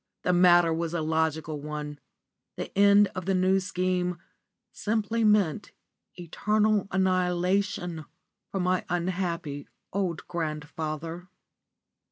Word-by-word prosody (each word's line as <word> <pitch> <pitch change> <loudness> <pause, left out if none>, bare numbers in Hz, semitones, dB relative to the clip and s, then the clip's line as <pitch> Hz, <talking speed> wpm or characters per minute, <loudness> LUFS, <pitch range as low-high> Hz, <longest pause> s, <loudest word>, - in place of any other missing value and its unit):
The 180 - +2
matter 175 -2 +5
was 165 +1 -2
a 165 - 0
logical 160 -1 -1
one; 150 -1 -6 0.6
the - - -6
end 200 0 +6
of 185 -3 -5
the 195 - +2
New 185 +1 +3
Scheme 180 -1 -1 0.5
simply 220 +1 -1
meant 210 -7 +2 0.4
eternal 210 +4 +1
annihilation 180 -2 0 0.5
for 195 - -2
my 180 0 +1
unhappy 175 -5 -2 0.3
old 185 -4 -2
grandfather. 160 +1 -4
180 Hz, 105 wpm, -27 LUFS, 160-190 Hz, 0.6 s, end